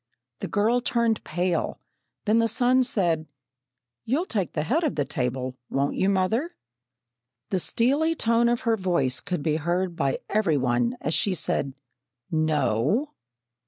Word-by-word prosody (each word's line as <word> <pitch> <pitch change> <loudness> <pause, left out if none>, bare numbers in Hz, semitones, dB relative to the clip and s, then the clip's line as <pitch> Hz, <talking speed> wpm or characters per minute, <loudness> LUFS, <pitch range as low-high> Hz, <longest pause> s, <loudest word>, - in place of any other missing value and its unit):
The - - -4
girl 225 +4 +2
turned 235 -2 0
pale, 175 +1 -1 0.5
then 220 +2 +3
the 230 - +3
son 250 +3 +3
said: 175 -10 0 0.8
"You'll 285 +10 0
take 200 - -2
the 150 - -1
head 300 - +1
of 305 - 0
the 145 - 0
table, 130 0 -2
won't 140 +1 0
you, 190 - +2
mother?" 200 - +1 1.0
The 190 - +1
steely 285 - +1
tone 230 -3 +2
of 240 0 0
her 230 -1 +2
voice 170 -10 +1
could 180 -5 -3
be 155 -1 +1
heard 175 +3 -1
by 140 -4 0
every 200 -8 +1
one 120 -2 0
as 155 - -1
she 195 +2 +2
said, 135 -4 -2 0.6
"No!" 155 - +1
185 Hz, 150 wpm, -25 LUFS, 150-235 Hz, 1.0 s, then